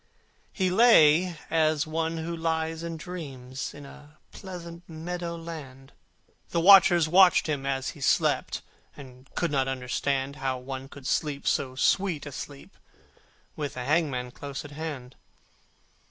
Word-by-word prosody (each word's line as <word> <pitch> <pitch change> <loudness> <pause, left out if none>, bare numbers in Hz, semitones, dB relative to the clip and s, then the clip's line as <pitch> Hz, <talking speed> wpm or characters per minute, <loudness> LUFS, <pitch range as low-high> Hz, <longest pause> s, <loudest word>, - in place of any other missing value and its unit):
He 185 -3 0
lay 180 -6 +5
as 155 -1 +2
one 160 +1 -2
who 165 +1 -4
lies 160 0 -2
and 165 -1 -5
dreams 140 -7 -7
In 145 0 -11
a 150 +2 -15
pleasant 175 -3 -9
meadow 170 +1 -5
land, 145 -6 -9 0.6
The 170 - 0
watchers 175 -2 +7
watched 180 +2 +6
him 145 -3 -2
as 135 -1 -1
he - - -10
slept, - - +1 0.3
And 130 -1 -13
could 170 -3 0
not 135 -2 +1
understand 135 +2 -2
How 130 -1 -2
one 130 +1 -7
could 140 -2 -12
sleep 140 +1 -1
so 130 -2 0
sweet 175 +3 +1
a 145 - -7
sleep 140 +1 -9 0.8
With 145 -4 -5
a 125 - -4
hangman 140 -5 0
close 140 +1 -7
at 145 - -10
hand. 145 -4 -7
155 Hz, 140 wpm, -27 LUFS, 135-170 Hz, 0.8 s, watchers